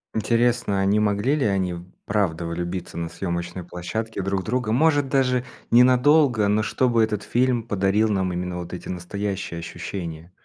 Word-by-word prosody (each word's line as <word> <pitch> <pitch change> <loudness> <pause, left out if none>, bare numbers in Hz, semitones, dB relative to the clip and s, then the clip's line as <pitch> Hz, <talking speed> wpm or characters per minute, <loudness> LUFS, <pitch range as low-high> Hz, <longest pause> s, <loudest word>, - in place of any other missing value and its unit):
Интересно, 115 -2 +1
а 95 - +1
не 105 +2 +3
могли 105 +6 +1
ли 145 - 0
они 95 -3 0 0.3
правда 95 -5 0
влюбиться 85 +2 -4
на 85 - -3
съемочной 85 0 -4
площадке 100 +6 -4
друг 95 0 -1
в - - -10
друга. 120 +1 -1
Может, 145 +2 +3
даже 125 -2 +2 0.3
ненадолго, 125 -1 +5
но 105 +1 +2
чтобы 120 +1 +2
этот 105 -2 -1
фильм 125 -1 +1
подарил 105 0 +1
нам 95 -3 0
именно 90 0 -3
вот 90 0 -7
эти 90 - -7
настоящие 95 0 -4
ощущения. 85 0 -6
100 Hz, 160 wpm, -23 LUFS, 90-120 Hz, 0.3 s, ненадолго